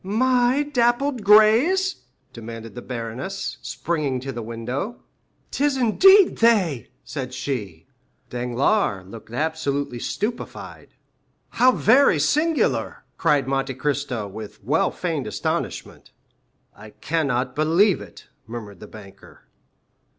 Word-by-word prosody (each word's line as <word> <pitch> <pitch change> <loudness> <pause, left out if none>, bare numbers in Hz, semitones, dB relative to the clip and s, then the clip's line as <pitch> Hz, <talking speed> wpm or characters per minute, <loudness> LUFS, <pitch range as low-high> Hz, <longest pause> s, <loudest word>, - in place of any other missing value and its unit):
"My 250 +6 +2
dappled 250 -2 0
grays?" 230 - +5 0.4
demanded 115 -1 -9
the 120 - -8
baroness, 125 +6 -5
springing 145 -1 -2
to 135 +1 -5
the 120 -2 -6
window. 120 - -5 0.5
"'Tis 285 -1 0
indeed 375 - +5
they!" 195 - +2
said 130 -2 -6
she. 110 - -5 0.5
Danglars 125 - 0
looked 110 +3 -12
absolutely 145 -2 -2
stupefied. 220 - -5 0.5
"How 255 +2 +4
very 250 - +4
singular," 300 - 0 0.2
cried 145 -3 +2
Monte 135 -1 -1
Cristo 130 -5 -2
with 105 +1 -10
well - - +1
feigned - - -3
astonishment. - - -4 0.7
"I 105 +1 -12
cannot 130 -2 -2
believe 165 - +3
it," 100 -4 -13 0.2
murmured 110 -5 -8
the 105 - -10
banker. 100 -2 -14
145 Hz, 105 wpm, -23 LUFS, -, 0.7 s, grays